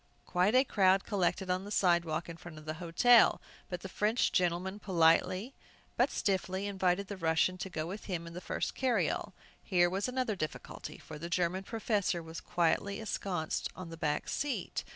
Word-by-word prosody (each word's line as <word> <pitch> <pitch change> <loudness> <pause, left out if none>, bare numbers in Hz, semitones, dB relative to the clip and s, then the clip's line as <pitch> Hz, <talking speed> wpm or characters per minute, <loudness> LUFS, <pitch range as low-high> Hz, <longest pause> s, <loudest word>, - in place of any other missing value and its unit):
Quite 185 +6 +2
a 260 - +7
crowd 195 -6 +3
collected 185 -2 0
on 185 +1 0
the 205 - -8
sidewalk 170 -5 +1
in 170 - -7
front 165 -1 -11
of 155 - -11
the 155 - -3
hotel. 225 +8 +5 0.3
But 180 -1 -4
the - - -6
French 210 +5 +1
gentleman 180 +2 0
politely, 185 +5 +2 0.4
but - - +3
stiffly, 190 -1 -1
invited 190 -1 +1
the 200 0 -7
Russian 165 +1 +2
to 190 - -4
go 155 -3 -3
with 195 +5 -6
him 175 -4 -3
in 170 - -9
the 180 - -6
first 160 - -2
carryall. 255 -2 0 0.3
Here 175 -2 +2
was 195 +4 -1
another 250 -4 -1
difficulty. 155 -4 -6
For - - -10
the 170 +2 -5
German 180 +1 0
professor 210 -6 -1
was 160 0 -8
quietly 175 +4 0
ensconced 185 -7 -2
on 185 -2 -8
the 165 - -7
back 150 -2 -1
seat! 285 -2 -2
185 Hz, 180 wpm, -32 LUFS, 170-200 Hz, 0.4 s, a